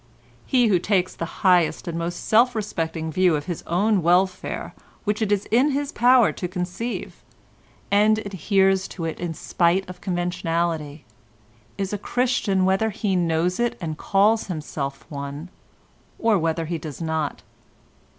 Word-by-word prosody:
He 250 -2 +3
who 195 -5 +3
takes 185 -1 +1
the 170 +4 -7
highest 180 -3 +3
and 170 - -3
most 170 +1 -4
self 235 +3 +4
respecting 165 -6 -3
view 180 0 +3
of 145 -1 -3
his 175 -3 -4
own 200 +3 +2
welfare 180 +2 +1 0.3
which 210 0 -1
it 210 -2 0
is 205 -1 +1
in 250 +6 +4
his 285 0 -2
power 245 -1 +5
to 180 - -4
conceive, 180 +6 -5 0.7
and 210 +2 +4
adheres 195 -1 +1
to 170 - -6
it 160 - -4
in 170 -2 -3
spite 175 +5 +1
of 180 -1 -10
conventionality, 170 -4 -2 0.7
is 195 0 -3
a 205 - -2
Christian 225 -6 +1
whether 195 +4 +2
he 205 -2 -1
knows 170 +1 +1
it 240 -1 0
and 160 -3 -4
calls 210 +7 +2
himself 145 -5 -5
one, 140 +3 -6 0.7
or 225 -2 +2
whether 165 0 -1
he 165 0 -3
does 150 -2 -8
not. 160 -3 -2
180 Hz, 150 wpm, -23 LUFS, 165-210 Hz, 0.7 s, power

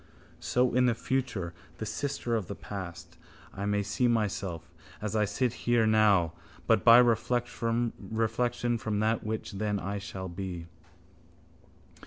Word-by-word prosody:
So 125 0 +1
in 125 +1 +4
the 120 - +2
future, 125 -9 -2 0.2
the 110 - -4
sister 120 +1 -2
of 105 -6 -2
the 100 - -5
past, 85 -4 -8 0.4
I 100 +1 -3
may 105 0 +1
see 125 +5 +1
myself 100 -7 -1 0.3
as 105 0 -3
I 105 -1 +3
sit 120 +4 0 0.2
here 120 -2 +4
now 105 -6 +4 0.3
but - - +3
by 115 0 +9
reflection 120 0 +1 0.9
from 105 -2 -1
that 110 +1 +1
which 110 0 -3
then 105 0 -1
I 100 +3 -3
shall 95 -1 -6
be. 90 -1 -5
110 Hz, 140 wpm, -29 LUFS, 95-120 Hz, 0.9 s, by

